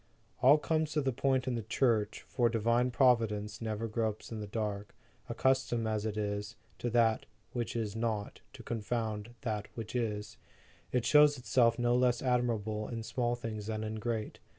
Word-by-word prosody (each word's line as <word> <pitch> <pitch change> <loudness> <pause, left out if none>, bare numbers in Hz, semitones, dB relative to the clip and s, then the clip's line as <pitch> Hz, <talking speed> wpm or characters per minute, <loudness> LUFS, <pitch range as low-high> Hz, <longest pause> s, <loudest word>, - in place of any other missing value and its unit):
All 140 +4 +7
comes 155 0 0
to 150 - +2
the 135 -1 +1
point 130 +1 +1
in 130 - 0
the 115 - -1
Church, 110 -1 +1
for 120 -3 +2
Divine 115 +2 +2
Providence 115 -5 +2
never 110 0 -2
gropes 110 0 -2
in 110 - -4
the 105 - -5
dark. 105 -1 -4 0.3
Accustomed 130 -3 +1
as 110 0 -1
it 105 -1 -4
is, 105 +2 -3 0.2
to - - -2
use 120 - -3
that 115 -2 +3 0.3
which 120 -2 -3
is 110 -3 -2
not, 110 -3 -2
to - - -11
confound 110 0 -3
that 105 -4 -3
which 115 +1 -6
is, 105 -4 -2 0.5
it 125 -2 +1
shows 150 -1 +6
itself 120 -2 +3
no 120 0 +2
less 125 -1 +2
admirable 115 -4 0
in 115 -2 -5
small 120 +1 -1
things 110 -3 -5
than 110 -1 -2
in 110 0 -4
great. 110 -1 -3
115 Hz, 175 wpm, -32 LUFS, 110-125 Hz, 0.5 s, All